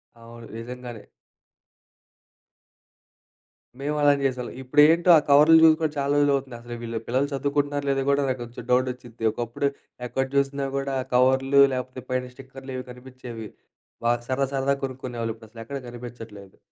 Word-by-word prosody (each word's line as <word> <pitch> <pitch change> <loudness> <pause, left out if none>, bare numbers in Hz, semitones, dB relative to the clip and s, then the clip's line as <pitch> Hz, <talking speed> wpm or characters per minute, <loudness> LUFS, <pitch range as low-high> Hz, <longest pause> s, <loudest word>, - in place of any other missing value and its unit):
అవును. 115 0 -13
నిజంగానే. 120 -2 -8 2.8
మేము 150 +2 -2
అలానే 145 -1 +4
జేసేవాళ్ళం. 125 -2 -2
ఇప్పుడేంటో 150 +6 +4
ఆ - - +6
కవర్లు 150 +3 +7
జూసి 160 -1 +8
కూడా 155 - +1
చాలా 140 0 0
రోజులవుతుందసలు. 130 -4 -1
వీళ్ళు 115 -1 -3
పిల్లలు 130 +4 +1
చదువుకుంటున్నారో 145 +1 -1
లేదో 135 -1 +1
గూడా 140 0 +3
నాకు 130 -1 -2
కొంచెం 120 0 -10
డౌటొచిద్ది. 125 -2 -1
ఒకప్పుడు 120 +5 -2 0.4
ఎక్కడ 135 +3 -1
జూసినా 140 0 +1
గూడా 135 0 -2 0.2
కవర్లు 130 +2 +4
లేపోతే, 130 0 -5
పైన 125 0 -2
స్టిక్కర్‌లివి 130 0 -8
గనిపించేవి. 125 -3 -9 0.6
బాగా 120 0 +2
సరదా 135 +1 +1
సరదాగా 140 +1 0
కొనుక్కునేవాళ్ళు. 125 -3 -5
ఇప్పుడసలెక్కడ 115 +4 -9
గనిపించట్లేదు. 115 -5 -10
130 Hz, 125 wpm, -25 LUFS, 120-140 Hz, 2.8 s, జూసి